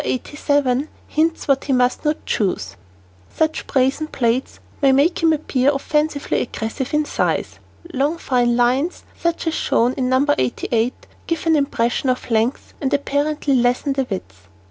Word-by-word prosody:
87 285 0 0 0.2
hints 325 +1 0
what 275 -1 +2
he 275 - 0
must 250 0 +2
not 300 0 -1
choose. 95 - -1 0.6
Such 315 0 -1
brazen 270 +3 +1
plaids 250 -3 -1 0.2
only 270 -1 +5
make 300 +7 +2
him 325 -1 +4
appear 285 -3 +1
offensively 300 +1 0
aggressive 240 +3 -4
in 300 0 +1
size. - - -1 0.3
Long, 285 +5 0
fine 245 -6 +1
lines, 255 +8 +1
such 340 0 -2
as 325 - 0
shown 245 -5 +1
in 255 -2 -1
No. 260 +2 +3
88, 225 - -1 0.2
give 330 -2 -2
an 325 -1 +4
impression 260 -3 0
of 250 -1 -2
length 230 +4 0
and 270 -1 0
apparently 285 +1 0
lessen 250 +3 +2
the 270 -2 -1
width. 95 - -7
270 Hz, 150 wpm, -20 LUFS, 245-300 Hz, 0.6 s, only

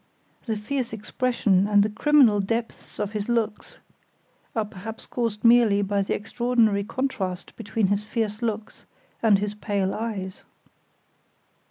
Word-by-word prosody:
The 220 -1 -1
fierce 245 +3 -3
expression, 210 -3 +1
and 205 -1 +5
the 210 - 0
criminal 245 -2 +4
depths 225 +3 -3
of 205 - -2
his 210 +1 -4
looks 230 - -2 0.8
are 220 -2 +1
perhaps 220 +2 -8
caused 230 -4 -3
merely 230 -4 +5
by 200 0 0
the 195 - -1
extraordinary 225 -2 +1
contrast 200 -6 -3
between 220 -1 -1
his 200 +2 +1
fierce 215 0 -2
looks 220 -2 -4 0.3
and 215 -3 +5
his 205 +1 -2
pale 200 -2 -1
eyes." 205 -4 -4
215 Hz, 135 wpm, -25 LUFS, 200-230 Hz, 0.8 s, and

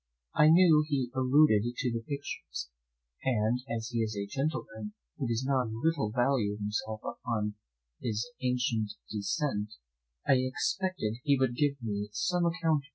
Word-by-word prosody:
I 150 - +6
knew 165 -2 +7
he 135 -5 0
alluded 130 -3 +5
to 125 -1 -1
the 115 0 -2
pictures, 115 - -5 0.5
and 120 -1 +2
as 115 0 -3
he 120 -2 -2
is 110 -2 -1
a 100 - -1
gentleman 150 - -3 0.3
who 135 - -1
does 115 +2 0
not 130 -3 +2
a - - -6
little 135 +1 0
value 120 -3 +1
himself 105 +1 -3
upon 110 -3 -2 0.5
his 110 +1 -1
ancient 125 -4 0 0.2
descent, 105 0 -1 0.5
I 135 - +5
expected 145 - -1
he 140 -2 +4
would 130 -2 +2
give 140 0 +1
me 105 -2 -2
some 175 +8 +1
account 165 -2 +2
of - - -3
them. 140 - -19
125 Hz, 160 wpm, -30 LUFS, 110-145 Hz, 0.5 s, knew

